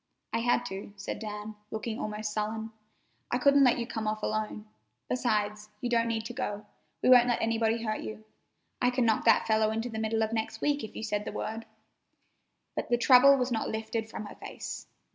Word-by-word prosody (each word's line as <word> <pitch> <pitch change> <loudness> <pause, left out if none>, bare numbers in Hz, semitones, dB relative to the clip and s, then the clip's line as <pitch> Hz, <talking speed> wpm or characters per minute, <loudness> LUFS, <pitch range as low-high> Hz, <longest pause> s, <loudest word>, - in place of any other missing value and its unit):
"I 230 - +2
had 245 +1 +2
to," 200 -2 -6
said 195 +1 -5
Dan, 210 0 -6 0.2
looking 220 0 -4
almost 210 0 -3
sullen. 220 +1 -2 0.6
"I - - +1
couldn't 280 +2 +5
let 250 - +5
you 235 - -2
come 220 -3 -4
off 215 0 -2
alone. 215 0 -2 0.4
Besides, 210 -3 0
you 245 +1 -3
don't 230 -1 +3
need 225 -1 -1
to 245 - -5
go. 210 -5 -3 0.4
We - - +4
won't 245 -1 +8
let 240 - +1
anybody 225 0 +1
hurt 215 -1 -2
you. 215 0 -7 0.6
I 250 - +4
can 250 -1 +1
knock 220 -1 +2
that 230 - +5
fellow 220 -1 +3
into 225 +2 -2
the 220 -1 -4
middle 220 0 +1
of 220 +1 -2
next 220 -1 -2
week 290 0 +1
if 220 - -8
you - - -5
say 210 -2 0
the 210 - -5
word." 225 +1 -4 1.1
But - - -3
the 240 - +3
trouble 265 +3 +7
was 250 -1 0
not 225 -2 -1
lifted 220 0 -3
from 215 - -6
her - - -8
face. - - -7
225 Hz, 205 wpm, -29 LUFS, 215-240 Hz, 1.1 s, won't